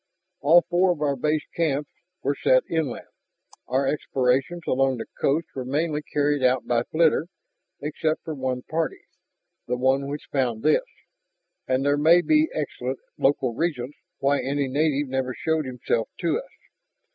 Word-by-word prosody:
"All 165 +4 +6
four 180 +1 +3
of 155 - -12
our 140 -1 +1
base 150 +3 0
camps 150 -3 0 0.3
were 140 - +1
set 130 -1 +3
inland, 160 -7 -2 0.6
our 135 +2 +1
explorations 135 +4 0
along 135 0 +2
the - - -5 0.2
coast 150 +4 +2
were 130 - -4
mainly 150 +4 -1
carried 145 -1 0
out 130 0 +2
by 120 -1 +2
flitter, 160 +4 +2 0.5
except 155 +2 -1
for 160 - -4
one 130 -3 -3
party 160 -2 -2 0.6
the 125 - -1
one 135 +2 +2
which 145 +1 -5
found 120 -5 0
this. 155 - +3 0.8
And 130 +1 +1
there 145 0 +3
may 165 +4 +6
be 310 - +3
excellent - - -3 0.2
local 135 -3 +2
reasons 145 -2 -2 0.2
why 140 +1 +2
any 140 0 -1
native 145 +1 +1
never 130 -1 -2
showed 160 -1 0
himself 125 -2 -2
to - - +1
us. - - -11
140 Hz, 155 wpm, -25 LUFS, 130-155 Hz, 0.8 s, All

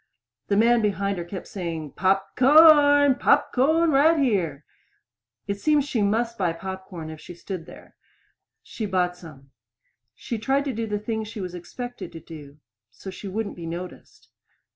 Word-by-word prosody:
The 200 - +1
man 235 +2 +4
behind 200 -2 -1
her - - -3
kept 180 +2 -8
saying, 165 -6 -5
"Pop 195 +1 0
corn! 290 0 +6
Pop 280 +2 +2
corn 315 +6 +3
right 305 +4 +4
here." 180 - 0 0.8
It 200 0 -4
seemed 300 -2 +2
she 250 -6 -1
must 230 +3 0
buy 175 -4 +1
pop 190 +2 -7
corn 165 -4 -8
if 155 - -11
she 175 - -11
stood 175 -1 -7
there. - - -14 0.7
She 220 - -5
bought 180 -2 0
some. 145 -6 -14 0.6
She 235 - -5
tried 270 +5 0
to 275 - -2
do 225 0 -3
the 210 -1 -2
thing 220 +1 -3
she 215 +1 -8
was 180 -2 -5
expected 245 +8 -8
to 165 - -8
do 150 -3 -12 0.3
so 155 +11 -10
she 190 +2 -9
wouldn't 205 +2 -4
be 170 -1 -8
noticed. 175 +2 -9
200 Hz, 170 wpm, -24 LUFS, 175-245 Hz, 0.8 s, corn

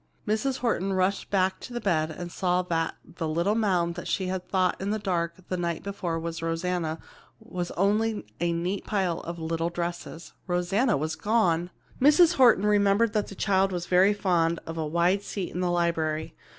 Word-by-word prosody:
Mrs. 235 +5 0
Horton 195 -5 0
rushed 190 +1 0
back 190 -1 +1
to 250 - -9
the 240 - -2
bed 160 -8 +1
and 175 +2 -7
saw 180 0 +1
that 165 -2 -1
the 165 -2 -5
little 170 +6 +1
mound 180 -6 +1
she 190 - -1
had 185 0 -4
thought 185 -1 +1
in 195 - -2
the 215 - 0
dark 170 -5 -1
the 185 - -2
night 170 -2 -2
before 185 -5 -3
was 165 0 -5
Rosanna 165 -1 -1 0.4
was 180 -1 -5
only 210 - +1
a 170 +1 +1
neat 175 +4 -2
pile 190 -5 -1
of 170 +1 -6
little 165 +1 -2
dresses. 170 -1 -5
Rosanna 190 +7 +1
was 155 +2 -2
gone! 175 -3 +1 0.3
Mrs. 315 +5 +6
Horton 240 -6 +6
remembered 205 +1 +3
that 210 -2 0
the 195 - -9
child 195 0 +2
was 175 -1 -3
very 185 +3 +4
fond 170 -4 +1
of 165 - -6
a 160 -1 -2
wide 170 +5 +2
seat 200 -2 -5
in 180 - -3
the 180 -1 +1
library. 165 -3 0
180 Hz, 185 wpm, -27 LUFS, 170-200 Hz, 0.4 s, Mrs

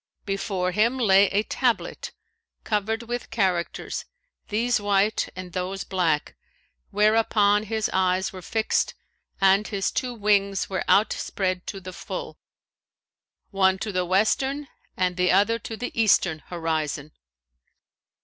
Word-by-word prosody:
Before 195 -2 -1
him 230 +7 +2
lay 200 -4 +5
a 205 +2 +1
tablet 245 +1 -1 0.5
covered 220 +1 -1
with 240 +1 -5
characters, 190 -6 -1 0.4
these 230 +2 +1
white 205 +1 +1
and 180 -1 -8
those 190 +1 -3
black,[FN#530] 170 -6 0 0.6
whereon 210 0 +3
his 220 0 -1
eyes 185 0 +1
were 185 - -8
fixed, 220 +4 0 0.4
and 195 +2 +4
his 195 -2 -1
two 250 -1 -2
wings 200 -2 +1
were 190 -1 -2
outspread 185 -3 +1
to 195 - -5
the 185 -1 -9
full, - - -7 1.1
one 190 -1 +3
to 210 +2 -4
the 185 -1 0
western 265 +10 +1 0.3
and 180 -1 0
the 180 0 +3
other 205 +5 +3
to 225 0 -7
the 245 - -4
eastern 190 -7 +3
horizon. 155 -3 -3
200 Hz, 125 wpm, -25 LUFS, 185-220 Hz, 1.1 s, lay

